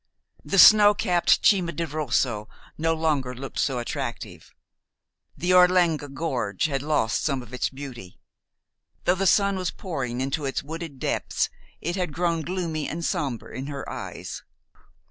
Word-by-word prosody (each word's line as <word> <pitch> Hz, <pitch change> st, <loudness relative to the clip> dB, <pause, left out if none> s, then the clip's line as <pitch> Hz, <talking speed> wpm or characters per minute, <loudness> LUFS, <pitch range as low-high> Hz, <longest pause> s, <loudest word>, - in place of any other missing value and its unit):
The 195 Hz, -, -1 dB
snow 210 Hz, +1 st, +9 dB
capped 180 Hz, -5 st, +2 dB
Cima 180 Hz, -5 st, +4 dB
di 170 Hz, -, -2 dB
Rosso 130 Hz, -7 st, -1 dB, 0.3 s
no 165 Hz, +1 st, 0 dB
longer 145 Hz, -6 st, 0 dB
looked 135 Hz, +3 st, -6 dB
so 135 Hz, -3 st, +1 dB
attractive. 120 Hz, -, -5 dB, 0.9 s
The 180 Hz, +1 st, +1 dB
Orlegna 180 Hz, -4 st, +4 dB
Gorge 130 Hz, -, -2 dB
had 140 Hz, -3 st, -1 dB
lost 145 Hz, -6 st, 0 dB
some 135 Hz, -4 st, -1 dB
of 120 Hz, +1 st, -15 dB
its 125 Hz, -, -1 dB
beauty. 130 Hz, -9 st, -10 dB, 0.8 s
Though 175 Hz, -, +3 dB
the 190 Hz, +1 st, 0 dB
sun 200 Hz, +1 st, +3 dB
was 185 Hz, -1 st, -1 dB
pouring 135 Hz, -10 st, -4 dB
into 135 Hz, +3 st, -2 dB
its 135 Hz, -, -2 dB
wooded 160 Hz, -1 st, -7 dB
depths, -, -, -1 dB, 0.3 s
it 175 Hz, +4 st, -2 dB
had 180 Hz, -5 st, -2 dB
grown 170 Hz, -1 st, 0 dB
gloomy 165 Hz, -3 st, -3 dB
and 165 Hz, +1 st, -4 dB
somber 130 Hz, -6 st, -2 dB
in 130 Hz, +3 st, -6 dB
her 140 Hz, -2 st, -6 dB
eyes. -, -, -6 dB
155 Hz, 150 wpm, -25 LUFS, 135-175 Hz, 0.9 s, snow